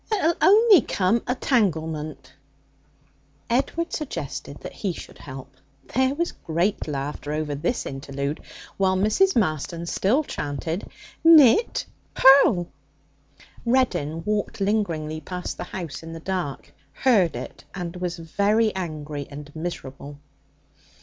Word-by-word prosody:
'It'll 360 -6 +3
only 420 - +7
come 205 +2 +1
a 250 - +1
tanglement,' 160 - -1 1.2
Edward 280 +7 0
suggested 305 -3 -5
that - - -8
he 195 -4 -2
should - - -11
help; 135 0 -9 0.4
there 260 +2 +2
was 340 +3 -1
great 170 +5 -1
laughter 145 0 -4
over 150 -1 -2
this 170 - -2
interlude, 140 +2 -4 0.4
while 190 -1 +2
Mrs. 215 - +3
Marston 170 - 0
still 220 - +1
chanted, 160 - -4 0.3
'Knit, 325 - +6 0.3
purl!' 260 -10 +6 1.0
Reddin 175 - +1
walked 210 +1 -2
lingeringly 170 -7 -1
past 180 +3 -5
the - - -5
house 170 -6 -6
in 165 0 -8
the 165 - -7
dark, 175 -5 -4 0.2
heard 200 - +3
it, - - -7
and 175 -1 -5
was 180 -1 -3
very 205 +6 +1
angry 150 -5 -5
and 145 +1 -10
miserable. 145 -4 -6
180 Hz, 120 wpm, -24 LUFS, 155-230 Hz, 1.2 s, only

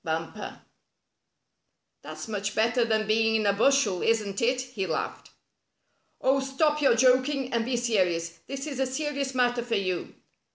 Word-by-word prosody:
Bumper." 165 +6 -5 0.8
" - - -53
That's - - -8
much 205 -1 -3
better 230 +2 +2
than 220 -1 0
being 225 +1 +2
in 215 -1 +1
a 200 - +3
bushel, 220 -4 +2
isn't 210 -3 0
it?" 250 +2 +2
he 250 -7 -5
laughed. 160 - -4 0.9
"Oh, 270 +1 +2
stop 295 +3 0
your 270 -5 +4
joking, 255 +2 +2
and 230 -1 +1
be 245 0 -1
serious. 180 -8 0
This 275 +1 -5
is 280 -4 -5
a 265 - +1
serious 275 0 -3
matter 245 -1 +2
for 235 -1 -2
you." 185 -3 -2
235 Hz, 160 wpm, -27 LUFS, 205-265 Hz, 0.9 s, your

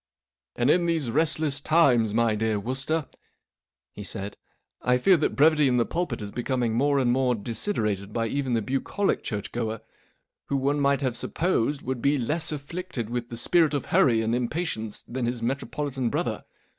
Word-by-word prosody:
" - - -67
And 125 +4 +3
in 175 -1 +2
these 160 -8 0
restless 150 0 +2
times, 130 -10 +4
my 115 0 +2
dear 110 0 0
Wooster," 135 +7 -1 0.9
he - - -9
said, 100 +1 -5 0.3
" - - -53
I 125 - +5
fear 185 +9 +5
that 155 - 0
brevity 150 0 +5
in 125 -1 +2
the 120 - +3
pulpit 175 -9 -3
is 100 - -6
becoming 120 -1 -1
more 140 +4 +2
and 125 -3 +2
more 125 -1 +2
desiderated 105 - -2
by 115 +1 -1
even 130 +1 -1
the 115 - 0
bucolic 135 - -1
churchgoer, 110 +1 -4 0.6
who 140 - -1
one 140 +2 0
might 140 0 +2
have 130 -3 -1
supposed 145 -5 0
would 130 -1 -3
be 145 +1 +2
less 155 +6 0
afflicted 150 -5 -5
with 120 -1 -3
the 115 - -6
spirit 160 +3 +3
of 140 - -2
hurry 115 -3 +4
and 110 +1 0
impatience 120 -3 -2
than 125 -1 -3
his 120 -1 -3
metropolitan 135 0 -2
brother. - - -2
130 Hz, 180 wpm, -26 LUFS, 115-150 Hz, 0.9 s, I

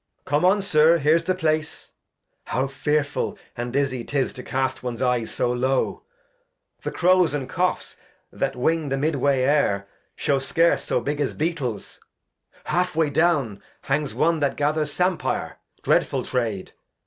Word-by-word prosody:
Edg. - - -51
Come 145 +4 +1
on. 195 +2 +3
Sir, 165 -3 +5
here's 160 +2 +2
the 185 +1 +1
Place, 155 -3 -2 0.5
how 130 - -1
fearfull 145 +2 -1 0.2
And 120 0 -4
dizzy 130 -2 -1
'tis 140 0 -1
to 125 - -8
cast 130 +1 -2
one's 120 -2 -4
Eyes 125 -3 +1
so 120 - -1
low. 130 +2 0 0.8
The - - -3
Crows 180 -3 +3
and 135 -3 -3
Choughs 180 +7 -2 0.3
that - - -2
Wing 155 +4 0
the 135 - 0
mid 155 +4 0
Way 135 -1 +2
Air 115 -9 +2 0.3
Shew 140 -3 +1
scarce 165 +5 +2
so - - 0
big 145 +4 -2
as 140 - -1
Beetles; 145 - -3 0.6
half 180 +1 0
Way 160 -2 +2
down 145 - +1 0.2
Hangs 145 +1 -1
one 165 +1 +2
that 140 -2 0
gathers 150 +1 0
Sampire, 180 +2 -1 0.2
dreadf - - +2
ull - - 0
Trade 110 -6 -2
145 Hz, 160 wpm, -23 LUFS, 130-160 Hz, 0.8 s, Sir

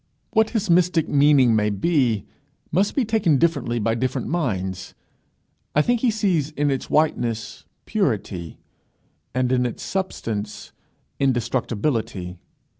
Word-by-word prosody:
What 220 0 +3
his 220 -3 -1
mystic 170 -2 +3
meaning 140 -5 +4
may 105 -1 +2
be, 115 - +1 0.5
must 190 +5 +1
be 270 - +2
taken 210 -9 +2
differently 140 -6 +1
by 115 0 +1
different 125 +2 -2
minds. 95 - -2 0.8
I 150 - +5
think 245 +5 +1
he 250 - +3
sees 190 -9 +1
in 145 -2 0
its 135 - -3
whiteness 120 -7 0 0.2
purity, 105 - -2 0.8
and 125 0 +1
in 125 -1 +2
its 120 -2 -4
substance 110 - -4 0.5
indestructibility. 115 - -1
135 Hz, 120 wpm, -23 LUFS, 115-170 Hz, 0.8 s, I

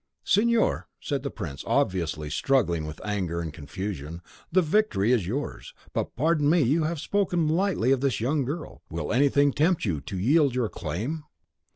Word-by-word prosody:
"Signor," 230 +1 +2
said 140 -3 -2
the 140 - -3
prince, 70 - -6
obviously 80 -5 0
struggling 85 - +1
with 75 0 -8
anger 95 -5 -1
and 80 -3 -4
confusion, 85 +1 -6 0.3
"the 185 +2 +4
victory 155 - +2
is 110 -9 +2
yours. 135 +9 -4 0.2
But - - -2
pardon 150 0 +2
me, 170 +1 +4
you 155 +6 +2
have 165 0 -2
spoken 180 -3 +1
lightly 165 - +2
of 135 -2 +2
this 135 -6 +1
young 140 +5 +1
girl, 150 +5 -5
will 80 +2 -3
anything 140 +2 +4
tempt 160 +1 +2
you 80 -8 -1
to 95 - -6
yield 140 - +3
your 120 -4 0
claim?" 110 - -4
130 Hz, 170 wpm, -26 LUFS, -, 0.3 s, the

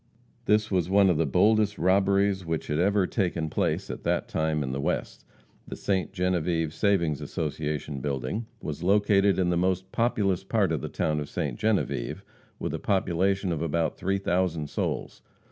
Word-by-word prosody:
This 105 0 +2
was 90 -2 +1
one 100 -1 +5
of 85 - 0
the 80 - +2
boldest 105 +5 +3
robberies 100 +1 +2
which 80 -2 -3
had 75 - -1
ever 100 +1 +3
taken 85 -6 -1
place - - 0
at - - -7
that - - 0
time 80 -1 0
in 65 - -3
the 70 +1 -3
West. - - -3 0.4
The - - -6
"Ste. 95 -2 -1
Genevieve 90 -4 0
Savings 85 -9 +1
Association" 75 -2 -3
building 70 - -3 0.2
was 75 -2 -4
situated 100 +1 +3
in 90 -2 +2
the 85 - +1
most 95 +1 0
populous 105 -6 +1
part 100 -2 +1
of 80 -5 -1
the - - -4
town 75 -1 -1
of 75 - -5
Ste. - - -2
Genevieve, 110 -2 -1 0.3
with - - -4
a - - -3
population 95 0 +1
of 80 -2 -2
about 85 0 0
three 95 +1 -1
thousand 90 -5 -1
souls. - - -3
90 Hz, 175 wpm, -27 LUFS, 80-100 Hz, 0.4 s, one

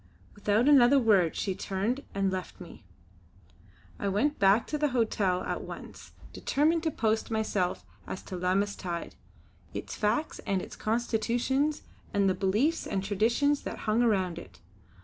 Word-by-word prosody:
Without 210 +4 +1
another 275 -2 +7
word 205 -10 +3
she 195 - -1
turned 205 +9 -2
and 195 -1 +1
left 185 -1 -5
me. 175 -10 -12 1.2
I 200 - -2
went 215 +10 +1
back 200 +3 +4
to 300 - -3
the 300 - +2
hotel 215 -7 0
at - - -3
once, - - -10 0.2
determined 315 +4 +1
to 320 - 0
post 220 -6 0
myself 215 -5 -1 0.2
as 185 - -6
to 185 - -7
Lammas 190 +3 0
tide; 175 -3 -5 0.6
its - - -5
facts 230 +9 -1
and 190 -2 -2
constitutions, 240 +6 0 0.3
and 200 -1 +3
the 190 - +3
beliefs 215 - +1
and 190 - -2
traditions 235 +9 +1
that - - -6
hung 215 +2 +2
around 190 -7 +1
it. - - -14
215 Hz, 150 wpm, -29 LUFS, 190-250 Hz, 1.2 s, another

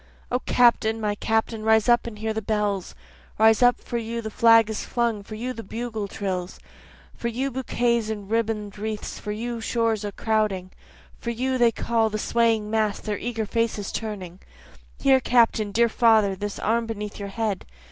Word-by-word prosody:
O 250 - +1
Captain! 235 -3 +3
my 210 -1 0
Captain! 220 +1 -1
rise 220 0 +3
up 240 0 +4
and 220 -3 -7
hear 220 +1 -2
the 220 - -2
bells; 205 - -1 0.4
Rise 220 +1 +5
up 245 0 +5
for 235 - -4
you 230 +1 -4
the 220 -1 -5
flag 230 0 +6
is 220 -1 -4
flung 235 -3 -1
for 215 +2 -9
you 250 +4 -4
the 230 - -7
bugle 225 0 -4
trills, 185 -2 -4 0.5
For 235 - -4
you 255 +4 -2
bouquets 235 -3 0
and 205 -2 -5
ribbon'd 215 -2 -2
wreaths 215 0 -4
for 210 - -5
you 235 +3 -4
the - - -7
shores 225 -2 0
a 205 - -3
crowding, 210 -4 -1 0.5
For 235 - -4
you 255 +2 -1
they 235 -1 +5
call, 225 -1 0
the 215 - -3
swaying 225 -1 +1
mass, 215 -2 +1
their 210 -2 -4
eager 225 -2 -3
faces 220 -2 -1
turning; 190 -5 -5 0.6
Here 270 -1 +4
Captain! 230 -4 +2
dear 235 +3 +3
father! 220 -4 +3
This 205 +1 -5
arm 230 +1 0
beneath 210 -2 -5
your 200 0 -5
head! 210 -2 -3
220 Hz, 185 wpm, -24 LUFS, 210-235 Hz, 0.6 s, flag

